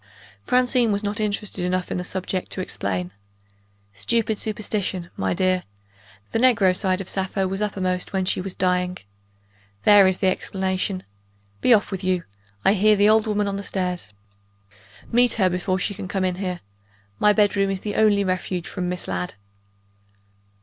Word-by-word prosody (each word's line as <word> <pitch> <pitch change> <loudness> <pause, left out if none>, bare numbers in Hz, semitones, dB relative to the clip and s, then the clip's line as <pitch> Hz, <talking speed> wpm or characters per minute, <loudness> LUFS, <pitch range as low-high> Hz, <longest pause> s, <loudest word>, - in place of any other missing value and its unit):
Francine 250 -2 +3
was 200 +1 -1
not 205 +1 -2
interested 210 -3 -2
enough 180 0 -1
in - - -1
the 180 - -3
subject 185 0 -4
to - - -3
explain. 90 - -3 0.8
"Stupid 220 - 0
superstition, 205 -4 -2
my 95 -1 -1
dear. 185 -1 +1 0.7
The 225 - 0
negro 225 -7 +4
side 190 -1 0
of 190 - -8
Sappho 190 0 -1
was 195 +2 -3
uppermost 185 -3 -1
when 190 -1 0
she 185 - +1
was 190 0 -5
dying 180 0 0 0.9
there 205 -2 +7
is 190 -1 +1
the - - -1
explanation. 190 0 -1 0.6
Be - - +3
off 215 -3 +4
with 190 0 -4
you! 185 -2 0 0.4
I 195 - +6
hear 215 +1 +4
the 205 +1 +4
old 220 +1 +4
woman 210 -1 0
on 200 0 -2
the - - -4
stairs. 180 - -3 1.0
Meet 240 0 +4
her 190 -4 +2
before 185 +1 -1
she 190 +2 -2
can 200 -1 -7
come 190 0 -1
in 180 -1 -1
here. 180 -2 -3 0.6
My 210 - +5
bedroom 205 -2 +2
is 195 0 -3
my 205 - -2
only 205 -2 +3
refuge 185 -1 -2
from 180 -2 -3
Miss 180 0 -4
Ladd." 90 0 -3
190 Hz, 170 wpm, -23 LUFS, 185-210 Hz, 1.0 s, there